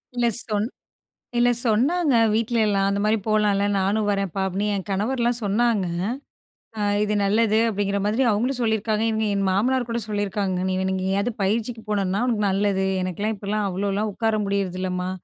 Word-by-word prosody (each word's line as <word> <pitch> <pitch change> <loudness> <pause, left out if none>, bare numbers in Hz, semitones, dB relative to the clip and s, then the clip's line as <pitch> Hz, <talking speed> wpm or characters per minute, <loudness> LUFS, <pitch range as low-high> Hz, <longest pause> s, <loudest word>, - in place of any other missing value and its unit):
இல்ல 240 -1 +1 0.2
சொன் 210 -1 -1 0.7
இல்ல 245 0 +4 0.2
சொன்னாங்க, 275 +7 +2 0.2
வீட்லயல்லாம். 215 -4 +1
"அந்த 200 0 -1
மாரி 215 +1 +2
போலாம்ல்ல, 210 -2 +2
நானும் 205 +3 0
வரேன்ப்பா." 195 -1 -2
அப்படீன்னு. 195 +3 -2
என் 195 - -3
கணவர்லாம் 235 +4 +1
சொன்னாங்க. 210 -1 +1 0.9
"அ - - -3 0.2
இது 210 - -1
நல்லது." 215 +2 +2
அப்படீங்கிற 200 -1 -1
மாதிரி 220 +6 +1
அவங்களும் 245 +5 0
சொல்லியிருக்காங்க. 220 -1 0
இவங்க 220 0 -1
என் 195 -1 0
மாமனார் 245 +6 +1
கூட, 235 0 -1
சொல்லியிருக்காங்க. 205 -2 -2
"நீ 185 - -1
வேண் 190 0 -1
எங்கேயாவது 195 +5 -1
பயிற்சிக்கு 225 +3 -1
போனன்னா, 195 -1 0
உனக்கு 215 -4 0
நல்லது. 195 0 0 0.2
எனக்குலாம் 200 +4 -2
இப்படிலாம் 205 +1 -2
அவ்வளோலாம் 200 +3 -2
உட்கார 225 +1 -1
முடியறதில்லம்மா. 185 -2 -2
210 Hz, 150 wpm, -23 LUFS, 195-225 Hz, 0.9 s, இல்ல